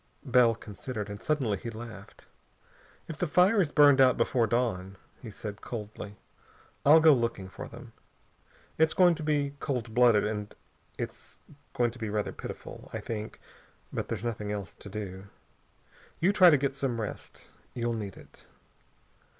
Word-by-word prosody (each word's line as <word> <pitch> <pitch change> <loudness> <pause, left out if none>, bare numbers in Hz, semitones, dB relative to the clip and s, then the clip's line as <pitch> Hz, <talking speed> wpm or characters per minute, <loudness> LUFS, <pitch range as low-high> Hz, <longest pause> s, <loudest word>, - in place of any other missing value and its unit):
Bell 125 -3 +4
considered. 105 0 -6
And 100 +1 -8
suddenly 130 -9 0
he 120 - -6
laughed. 110 -3 -10 0.8
"If 155 - -7
the 180 - 0
fire 180 +7 +4
has 165 -7 +2
burned 145 -2 +6
out 130 -2 +5
before 115 0 +2
dawn," 100 -5 -1 0.2
he 115 - -8
said 105 0 -8
coldly, 105 -2 -7 0.7
"I'll 150 +3 +8
go 160 -1 +7
looking 115 -6 -1
for - - -8
them. - - -12 0.9
It's 160 0 +3
going 180 -3 +6
to 165 - -6
be 145 -2 0
cold 125 -6 -3
blooded, 120 -3 +5
and 105 -1 -4 0.4
it's - - -7 0.4
going 120 -1 +2
to 120 - -12
be 110 -2 -3
rather 105 0 -1
pitiful, - - -9
I - - -4
think, 110 -1 -6 0.5
but - - -3
there's 115 0 -4
nothing 105 -3 -3
else 100 -4 -5
to 100 - -12
do. 100 -2 -6 0.9
You 190 +4 +3
try 185 -3 +8
to 150 - +5
get 135 0 -1
some 135 -4 -2
rest. 105 - -7 0.3
You'll 120 -1 -1
need 105 -4 -5
it." - - -17
115 Hz, 160 wpm, -29 LUFS, 105-140 Hz, 0.9 s, I'll